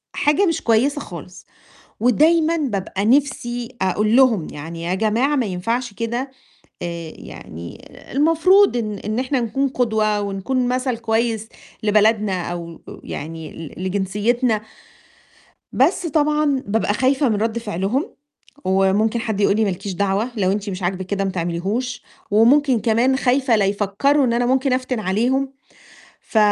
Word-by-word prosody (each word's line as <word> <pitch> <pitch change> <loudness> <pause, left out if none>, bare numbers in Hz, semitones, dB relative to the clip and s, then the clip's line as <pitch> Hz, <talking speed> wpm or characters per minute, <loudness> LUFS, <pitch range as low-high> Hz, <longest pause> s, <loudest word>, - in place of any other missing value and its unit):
حاجة 300 +7 +2
مش 330 -3 0
كويسة 265 +6 +2
خالص، 180 +2 -10 0.5
ودايمًا 315 +7 +3
بابقى 200 - -2
نفسي 245 -2 +1
أقول 210 +4 +1
لهم 235 -11 +4
يعني 165 +3 -7
يا 175 +2 -1
جماعة 225 +8 +1
ما 255 -5 +1
ينفعش 230 +6 -2
كده. 235 +5 -3 0.5
آآ 170 -2 -5
يعني 85 +2 -10 0.3
المفروض 330 +4 +4
إن 210 -3 -3
إن 215 +3 -3
إحنا 260 0 0
نكون 270 +4 0
قدوة 220 -5 0
ونكون 205 +6 -1
مثل 255 -1 -1
كويس 225 -1 -1 0.3
لبلدنا، 210 -3 +2
أو 170 -1 -7
آآ - - -10
يعني 160 +1 -7 0.2
ل 185 - -5
لجنسيتنا. 210 +5 0 1.1
بس 355 - +2
طبعًا 300 -3 +1
بابقى 205 0 +1
خايفة 265 +3 +2
من 215 - +1
رد 225 +2 -1
فعلهم، 210 - -2 0.5
وممكن 195 +4 +2
حد 220 -3 -2
يقول 200 +1 +3
لي، 220 - +2
ما 200 - +1
لكيش 195 +2 -5
دعوة، 200 +5 0
لو 190 -3 +1
أنتِ 205 0 -3
مش 185 0 -6
عاجبِك 185 +1 -2
كده 195 0 -1
ما 195 - -1
تعمليهوش. 190 +8 -2 0.3
وممكن 245 +4 +4
كمان 235 +4 +2
خايفة 260 -2 +2
لا 205 - +2
يفكروا 205 +9 +1
إن 235 - +1
أنا 245 +1 +1
ممكن 265 +1 +1
أفتن 255 -2 -1
عليهم، 245 +8 0 0.7
ف 220 - -1
225 Hz, 145 wpm, -20 LUFS, 195-260 Hz, 1.1 s, لهم